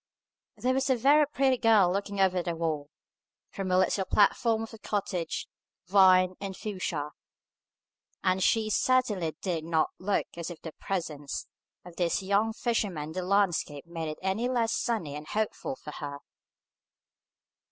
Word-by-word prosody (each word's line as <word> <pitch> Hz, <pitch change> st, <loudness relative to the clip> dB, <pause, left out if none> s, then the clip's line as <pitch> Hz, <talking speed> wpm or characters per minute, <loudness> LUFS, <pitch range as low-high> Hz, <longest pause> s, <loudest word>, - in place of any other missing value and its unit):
There 250 Hz, +5 st, +1 dB
was 265 Hz, +1 st, 0 dB
a 260 Hz, -, +4 dB
very 285 Hz, +5 st, +5 dB
pretty 270 Hz, -3 st, +1 dB
girl 210 Hz, -6 st, +5 dB
looking 200 Hz, 0 st, -3 dB
over 185 Hz, -2 st, +3 dB
the 170 Hz, -1 st, -3 dB
wall, 155 Hz, -3 st, -2 dB, 0.6 s
from 195 Hz, -1 st, -4 dB
a 185 Hz, -, +3 dB
little 190 Hz, +1 st, +2 dB
platform 220 Hz, +3 st, +3 dB
of 225 Hz, -, -9 dB
cottage, 185 Hz, -5 st, -2 dB, 0.4 s
vine, 185 Hz, -1 st, +5 dB
and 195 Hz, -2 st, -5 dB
fuchsia; 175 Hz, -8 st, -3 dB, 1.1 s
and 185 Hz, +1 st, +2 dB
she 215 Hz, +3 st, +2 dB
certainly 210 Hz, -, +1 dB
dig 170 Hz, -5 st, -1 dB
not 160 Hz, -1 st, +1 dB
look 200 Hz, +2 st, 0 dB
as 170 Hz, 0 st, -4 dB
if 175 Hz, -, -8 dB
the 160 Hz, -, -6 dB
presence 155 Hz, -7 st, -4 dB, 0.4 s
of 175 Hz, -1 st, -12 dB
this 175 Hz, +1 st, 0 dB
young 200 Hz, +3 st, +2 dB
fisherman 205 Hz, -10 st, -1 dB
in -, -, -8 dB
the 185 Hz, +3 st, -3 dB
landscape 180 Hz, -6 st, +1 dB
made 165 Hz, -2 st, -5 dB
it 155 Hz, -, -5 dB
any 195 Hz, +6 st, 0 dB
the 255 Hz, -, -1 dB
less 230 Hz, -1 st, +1 dB
sunny 175 Hz, -12 st, -1 dB
and 150 Hz, +1 st, -8 dB
hopeful 220 Hz, +5 st, -2 dB
for 150 Hz, -, -9 dB
her. 145 Hz, -1 st, -6 dB
190 Hz, 155 wpm, -29 LUFS, 170-220 Hz, 1.1 s, very